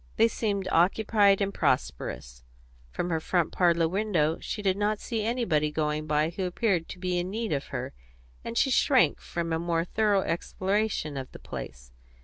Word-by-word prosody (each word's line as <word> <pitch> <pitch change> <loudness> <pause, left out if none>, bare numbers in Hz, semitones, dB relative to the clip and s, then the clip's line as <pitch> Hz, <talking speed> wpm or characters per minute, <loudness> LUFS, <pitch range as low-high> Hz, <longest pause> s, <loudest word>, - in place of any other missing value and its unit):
They 225 - +5
seemed 200 -4 -2
occupied 200 +3 +3
and 200 0 0
prosperous, - - -2 0.5
from 175 - -3
her 160 - +1
front 175 +1 0
parlour 170 -2 +3
window; 175 -4 0
she 210 - -5
did 190 -2 +2
not 210 +1 0
see 225 -2 -3
anybody 220 -11 +1
going 155 0 -1
by 155 +1 +1
who 185 +2 -3
appeared 180 -2 0
to - - -7
be 180 -1 -1
in 175 +1 -3
need 220 +2 -3
of 140 - -2
her; - - -5 0.5
and 230 - -5
she 270 - +3
shrank 260 0 +3
from 170 -1 -3
a 160 - 0
more 170 0 0
thorough 205 0 +2
exploration 185 -2 -1
of 130 -1 -6
the - - -8
place. 60 -1 -8
180 Hz, 175 wpm, -27 LUFS, 160-210 Hz, 0.5 s, They